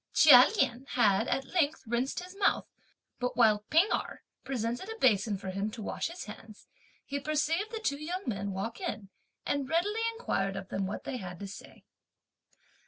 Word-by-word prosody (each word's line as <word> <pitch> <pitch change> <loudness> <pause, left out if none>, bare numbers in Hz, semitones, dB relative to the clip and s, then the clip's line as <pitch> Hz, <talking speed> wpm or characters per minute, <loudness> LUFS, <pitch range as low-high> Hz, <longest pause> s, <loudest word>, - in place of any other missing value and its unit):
Chia 255 -4 +9
Lien 250 -2 0
had, 220 -2 +3
at 270 0 -2
length, 320 -4 +1
rinsed 240 +7 -1
his 365 +1 -11
mouth; 400 0 +2 0.5
but 250 -1 -2
while 215 -3 +4
P'ing 335 +6 +5
Erh - - -3 0.2
presented 245 - -3
a 445 - -6
basin 210 - +3
for 190 0 -6
him 195 +3 -2
to 220 +1 -8
wash - - -2
his 340 +2 -7
hands, 215 0 -12 0.4
he 280 0 -3
perceived 310 +7 0
the 450 - -4
two 285 -8 -2
young 360 +5 -3
men 200 -4 -2
walk 200 +5 -4
in, 200 -2 -4 0.4
and 280 -2 -1
readily 405 +7 +1 0.2
inquired 195 - -1
of 190 - -6
them 195 0 -2
what 205 - -5
they 260 - -4
had 180 -5 -7
to 200 - -7
say. 195 - -12
250 Hz, 180 wpm, -30 LUFS, 210-320 Hz, 0.5 s, Chia